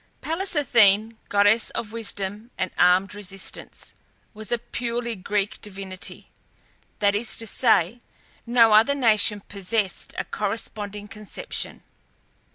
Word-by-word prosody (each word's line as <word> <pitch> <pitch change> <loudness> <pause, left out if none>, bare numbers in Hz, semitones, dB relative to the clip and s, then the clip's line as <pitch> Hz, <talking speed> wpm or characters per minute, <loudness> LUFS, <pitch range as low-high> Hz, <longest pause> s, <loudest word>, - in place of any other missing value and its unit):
Pallas 350 +3 -1
Athene, 225 -5 +4
goddess 205 +2 +3
of 215 - -5
Wisdom 210 -1 -5
and 185 -1 -2
Armed 180 +3 +4
Resistance, 195 -2 -5 0.4
was 215 +1 -7
a 240 - +2
purely 235 0 -3
Greek 200 +1 -2
divinity; 195 -1 -3 0.7
that 205 -1 +2
is 220 +3 0
to 225 - -5
say, 225 -2 +2 0.5
no 230 -2 +5
other 225 +7 +5
nation 215 -5 +3
possessed 200 0 -2
a - - -2
corresponding 205 -1 -4
conception. 220 - -5
210 Hz, 115 wpm, -24 LUFS, 200-230 Hz, 0.7 s, no